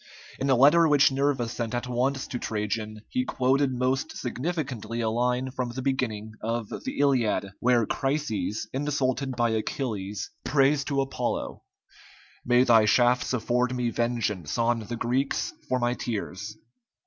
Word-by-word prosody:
In 135 - -1
a 130 - +5
letter 150 +6 +6
which 145 -2 +5
Nerva 135 -3 +1
sent 115 0 -3
at 120 - -2
once 130 +2 0
to 125 - -5
Trajan, 110 0 -3
he 255 - -1
quoted 135 - +1
most 130 +1 -1
significantly 125 - -3
a 110 -1 0
line 125 +2 0
from 125 -2 -3
the 125 +2 -5
beginning 115 -6 -1
of 115 -1 -2
the 265 - -5
"Iliad," 120 -8 +2
where 120 -2 +3
Chryses, 135 -6 -1
insulted 135 -1 -1
by 120 -1 +1
Achilles, 110 -3 -3
prays 140 0 +3
to 140 -1 0
Apollo: 135 -2 -3 0.8
"May 125 0 +4
thy 115 -4 +5
shafts 120 +3 +3
afford 125 +1 0
me 120 -1 0
vengeance 115 -8 -1
on 120 0 +2
the 115 +2 -5
Greeks 130 +4 -1 0.2
for 130 - +2
my 120 0 +1
tears." 105 -4 -5
125 Hz, 150 wpm, -27 LUFS, 115-135 Hz, 0.8 s, letter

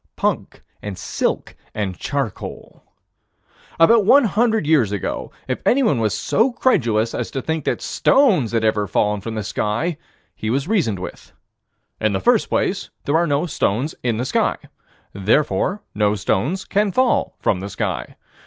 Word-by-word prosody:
Punk - - -2 0.2
and 100 -3 -6
silk - - -2 0.2
and 100 -4 -2
charcoal. 135 +1 -5 1.0
About 215 +6 +6
one 275 +8 +6
hundred 220 -2 +1
years 145 -10 +3
ago, 100 -3 -3 0.2
if - - -2
anyone 240 - +3
was 105 -2 0
so 235 +4 +2
credulous 115 - +1
as - - -3
to 135 - -3
think 160 +1 -3
that - - -1
stones 195 - +3
had 115 -1 0
ever 105 -2 +1
fallen 105 0 0
from 110 +2 -5
the 110 - -2
sky, 115 - -2 0.3
he 110 - -4
was 135 +5 0
reasoned 170 - +1
with: 90 - -9 0.7
In 110 -2 +1
the 95 - 0
first - - +2
place - - -1 0.2
there 145 - +1
are 170 +1 +3
no 145 +3 +1
stones 135 - -1
in 120 -3 0
the 125 - -2
sky: - - +1 0.6
Therefore 145 - +1
no 105 0 +2
stones 110 - -1
can 205 0 +1
fall 255 +4 +1
from 90 - +1
the 100 +2 -5
sky. - - -3
130 Hz, 160 wpm, -21 LUFS, -, 1.0 s, About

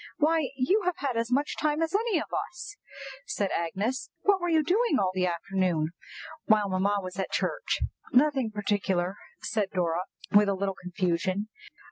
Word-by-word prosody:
why, 310 -2 +2
you 325 +12 +2
have 360 -1 0
had 270 -3 -2
as 230 +1 -1
much 285 +4 +1
time 300 0 0
as 325 +1 0
any 430 -2 +2
of 310 - -1 0.2
us," 355 +3 -9 0.5
said 200 -2 -1
Agnes. 200 - -2
"What 400 -2 +4
were 350 - 0
you 320 -2 +4
doing 370 - +2
all 190 -2 +2
the 185 -1 +1
afternoon 175 -2 0 0.6
while 215 -2 +4
mamma 195 +2 +1
was 185 0 -7
at 190 - -1
church?" - - -1 0.3
"Nothing 265 -2 +3
particular," 195 -3 0 0.3
said 210 -4 0
Dora, 175 -1 0 0.3
with 205 0 +6
a 200 - +1
little 195 0 -1
confusion. 185 +2 -1
210 Hz, 165 wpm, -28 LUFS, 185-305 Hz, 0.6 s, with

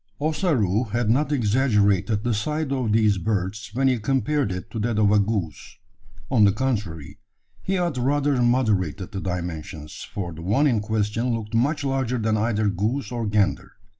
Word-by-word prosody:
Ossaroo 140 - +1
had 115 0 0
not 145 +5 +1
exaggerated 105 -5 +2
the 120 - 0
size 150 +7 -2
of 130 -5 0
these 105 -3 +3
birds 105 +1 -2
when 135 +1 +2
he 130 -3 +2
compared 135 +2 0
it 90 0 -6
to 115 - -4
that 110 0 -1
of 105 -1 +4
a 105 - +5
goose. 100 - -3 0.5
On 120 -5 +5
the 100 - +6
contrary, 105 - -3 0.4
he 190 - -2
had 175 -7 -1
rather 140 +1 +1
moderated 105 - +1
the 95 -3 -4
dimensions: 80 -4 -5
for 90 -4 -4
the 80 - -9
one 105 - +2
in 120 -7 +3
question 110 +3 -1
looked 110 -1 -6
much 140 +7 +1
larger 135 -2 -1
than 110 -1 0
either 110 -1 +1
goose 105 +6 -1
or 120 -3 -2
gander. 105 -1 0
110 Hz, 170 wpm, -24 LUFS, 100-130 Hz, 0.5 s, the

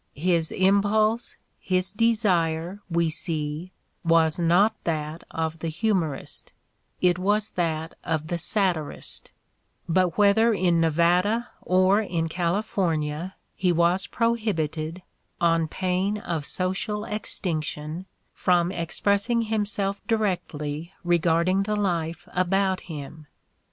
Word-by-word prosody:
His 165 +1 +1
impulse, 205 +4 +2 0.2
his 185 0 0
desire, 190 -5 +1
we 170 -1 +1
see, 155 +1 -3 0.3
was 165 -1 +3
not 180 +6 +4
that 155 0 -3
of 160 0 -3
the 165 - -3
"humorist"; 165 -4 -2 0.5
it 180 -1 +3
was 205 +3 +1
that 160 -2 -2
of 160 -2 -1
the 175 - -1
satirist; 175 -4 -1 0.6
but 180 0 +2
whether 215 +3 +5
in 175 -3 +2
Nevada 175 +8 +2
or 185 +3 +3
in 165 -6 -2
California 170 -2 -1 0.2
he 180 -2 +2
was 175 +2 +2
pro 230 0 +1
hibited, 165 -5 -3 0.4
on 165 -1 +2
pain 185 +4 -1
of 165 -7 -3
social 195 +5 -1
extinction, 165 -5 -3 0.3
from 175 -1 +2
expressing 200 +7 0
himself 205 -2 -1
directly 170 -8 -2
regarding 175 +2 +2
the 210 +1 -1
life 170 -5 -2
about 190 +1 +1
him. 155 -1 -9
180 Hz, 110 wpm, -25 LUFS, 165-200 Hz, 0.6 s, whether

